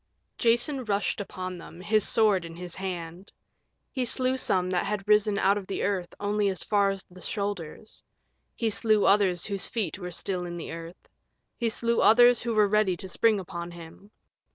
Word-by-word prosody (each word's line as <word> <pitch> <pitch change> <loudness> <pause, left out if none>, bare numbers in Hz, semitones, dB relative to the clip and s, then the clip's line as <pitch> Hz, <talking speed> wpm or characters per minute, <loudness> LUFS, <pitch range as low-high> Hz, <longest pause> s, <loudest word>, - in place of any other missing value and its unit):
Jason 240 +4 +1
rushed 205 -1 -1
upon 185 -2 -6
them, 170 - -12
his 215 +3 +1
sword 210 -5 +3
in 165 0 -9
his 175 0 -8
hand. 180 -1 -6 0.6
He 260 - -2
slew 255 +2 +2
some 185 -8 +1
that 180 -1 +1
had 205 -1 -3
risen 210 -1 +3
out 200 +1 +3
of 190 - -11
the 195 - -3
earth 185 -4 -2
only 205 0 +1
as 190 - -3
far 200 -2 +2
as 195 -1 -4
the 185 +1 -13
shoulders; 200 -2 -5 0.5
he 225 -2 -1
slew 215 0 +2
others 195 -3 +3
whose 200 -2 -3
feet 215 -4 -3
were 180 -2 -5
still 180 +1 -2
in 175 -1 -6
the 165 - -6
earth; 165 +1 -9 0.5
he 235 - -1
slew 235 +1 0
others 240 +2 +6
who 230 -1 -2
were 210 -1 +5
ready 200 -3 +2
to 190 - -6
spring 215 +3 +2
upon 170 -2 -6
him. 170 +3 -12
200 Hz, 185 wpm, -27 LUFS, 180-215 Hz, 0.6 s, others